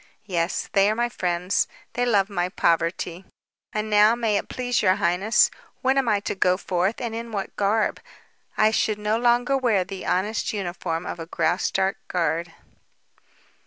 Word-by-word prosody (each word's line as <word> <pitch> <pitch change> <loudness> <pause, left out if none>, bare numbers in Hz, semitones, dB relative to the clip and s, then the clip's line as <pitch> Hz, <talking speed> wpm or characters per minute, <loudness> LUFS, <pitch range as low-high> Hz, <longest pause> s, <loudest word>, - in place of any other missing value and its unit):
"Yes. 175 -3 -1
They 195 +1 +4
are 215 - 0
my 240 +1 0
friends. 180 -2 0 0.3
They 245 +1 0
love 200 -4 +3
my 180 -3 -2
poverty. 170 0 0 0.5
And 215 0 -2
now, 210 +2 +5
may 225 -3 0
it - - -2
please 245 -1 -1
your 185 -2 +4
highness, 180 +6 +3 0.3
when 260 +1 +3
am 270 -3 +2
I 205 - +3
to - - -3
go 185 -1 +2
forth 185 +3 -1
and 235 -2 -4
in 230 0 -5
what 200 -2 -4
garb? 210 +2 +1 0.6
I 215 0 +4
should 215 -1 +1
no 210 +2 0
longer 245 +2 +3
wear 235 -8 +2
the 190 +1 -7
honest 205 +5 0
uniform 175 -3 -3
of - - -5
a 165 - -6
Graustark 185 +3 0
guard." 165 -1 -1
200 Hz, 165 wpm, -24 LUFS, 180-225 Hz, 0.6 s, now